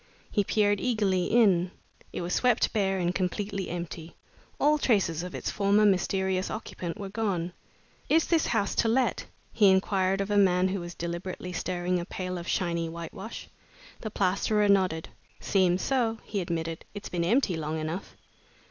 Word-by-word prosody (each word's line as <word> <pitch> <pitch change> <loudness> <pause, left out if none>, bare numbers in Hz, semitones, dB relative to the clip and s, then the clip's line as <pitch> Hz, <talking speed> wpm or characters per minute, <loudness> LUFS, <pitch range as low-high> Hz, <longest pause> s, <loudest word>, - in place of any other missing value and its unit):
He 205 - +2
peered 205 0 +2
eagerly 205 -7 +1
in. 190 -6 +4 0.4
It - - -4
was 175 +1 -3
swept 245 -2 +2
bare 195 -3 +1
and 175 -1 0
completely 195 +1 -2
empty. 170 -1 -6 0.4
All 300 +1 +4
traces 190 - +2
of 180 0 -6
its - - -3
former 205 +1 +3
mysterious 190 -1 +1
occupant 180 -5 -5
were 200 - -5
gone. 190 -5 -2 0.6
"Is 325 0 +4
this 330 -3 +2
house 205 -4 +1
let?" 240 +3 +1 0.3
he 205 -3 +5
inquired 190 0 +2
of 200 +1 -2
a 205 - +3
man 185 -2 +4
who 195 +1 -2
was 175 0 -7
deliberately 175 +1 -5
stirring 180 +1 -1
a 170 - -4
pail 185 -1 -4
of 170 - -8
shiny 170 -2 0
whitewash. 165 0 -7 0.5
The 220 - -5
plasterer 205 +2 +1
nodded. 185 -5 +2 0.3
"Seems 185 -2 +2
so," 240 -4 +1
he 205 -2 -3
admitted. 165 -2 -3
"It's 205 - -6
been 175 -1 -1
empty 205 0 +2
long 155 0 -3
enough." 160 +4 -5
190 Hz, 160 wpm, -28 LUFS, 175-205 Hz, 0.6 s, he